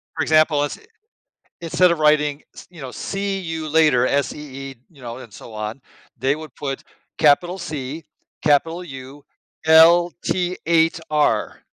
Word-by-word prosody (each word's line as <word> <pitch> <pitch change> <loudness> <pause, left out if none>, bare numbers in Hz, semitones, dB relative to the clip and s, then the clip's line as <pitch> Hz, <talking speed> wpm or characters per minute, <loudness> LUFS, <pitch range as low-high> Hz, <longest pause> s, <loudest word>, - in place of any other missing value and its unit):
For - - -2
example, 155 -2 +3
is 145 - -4
eh - - -20 0.8
instead 175 +2 +3
of 170 - -1
writing 150 -1 +2
s - - -13
you 175 -3 -13
know, 130 -2 -7
see 195 +6 -3
you 165 -3 -5
later 150 -6 +4
S-E-E, 135 -1 -3 0.2
you 145 -5 -19
know, 120 -1 -7
and 125 -4 -12
so 110 +1 -12
on, 110 +3 -5 0.4
they 135 +4 +1
would 155 0 -10
put 135 -1 -5 0.3
capital 170 +5 +3
C, 155 -3 -6 0.4
capital 165 +4 +2
U, 135 -2 -10 0.4
L-T-8-R, 165 -4 +3
150 Hz, 140 wpm, -21 LUFS, 135-165 Hz, 0.8 s, later